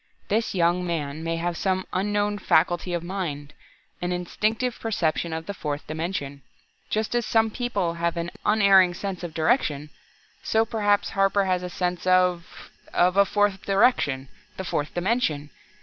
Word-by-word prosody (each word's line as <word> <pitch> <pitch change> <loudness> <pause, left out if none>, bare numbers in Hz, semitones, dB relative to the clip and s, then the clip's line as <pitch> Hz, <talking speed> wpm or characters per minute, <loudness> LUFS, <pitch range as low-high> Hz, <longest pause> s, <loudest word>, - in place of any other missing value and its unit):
This 220 0 0
young 175 0 +2
man 160 -3 -3
may 165 0 -1
have 170 +1 -2
some 190 +1 -1
unknown 205 +2 0
faculty 175 0 +2
of 170 -1 -2
mind 165 -6 -4 0.5
an 175 0 -1
instinctive 215 +7 -1
perception 170 -6 -1
of 160 0 -4
the 200 - -4
fourth 150 -5 -4
dimension. 155 -3 -4 0.5
Just 215 +1 -1
as 240 0 +1
some 225 0 +2
people 225 -8 -1
have 170 0 -1
an 170 +1 -3
unerring 195 -4 +5
sense 190 -1 -5
of 170 -2 -6
direction, 155 - +1 0.5
so 220 0 +2
perhaps 205 -2 +1
Harper 195 0 +2
has 185 -1 +1
a 180 - -5
sense 180 0 -2
of 180 -2 +1 0.2
of 180 +1 +3
a 200 0 +6
fourth 205 -1 +1
direction 195 - +2 0.3
the 190 - -4
fourth 150 -3 -2
dimension! 175 - 0
180 Hz, 155 wpm, -25 LUFS, 165-205 Hz, 0.5 s, a